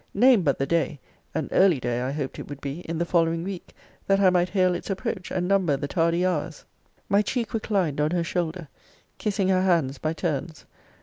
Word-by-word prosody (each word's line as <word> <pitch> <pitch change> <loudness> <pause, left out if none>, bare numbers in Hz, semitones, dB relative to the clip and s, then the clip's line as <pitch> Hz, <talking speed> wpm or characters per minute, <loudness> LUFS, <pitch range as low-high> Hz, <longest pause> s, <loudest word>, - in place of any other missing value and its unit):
Name 250 -4 +6
but 145 -5 +1
the 135 - 0
day 160 -1 0 0.4
(an 160 -3 -1
early 185 -7 +4
day, 120 0 -2
I 130 +2 -2
hoped 140 -2 -4
it - - -8
would 145 -1 -7
be, 140 +3 -5
in 165 - -2
the 170 - 0
following 165 -1 +1
week) 190 -1 -6 0.4
that 195 0 +3
I 190 -2 +5
might 180 0 +2
hail 185 -1 +2
its 175 - -5
approach, 195 -1 -3
and 180 -1 -1
number 185 -7 +2
the 140 +1 -3
tardy 170 +2 +1
hours. 165 -3 -2 0.4
My 200 +1 +4
cheek 235 +2 -2
reclined 195 -10 0
on 150 - +2
her 175 0 0
shoulder 170 -1 -3 0.5
kissing 200 -3 0
her 185 -1 +3
hands 165 -8 +1
by 155 +1 -1
turns. 160 -2 -3
170 Hz, 205 wpm, -25 LUFS, 150-190 Hz, 0.5 s, Name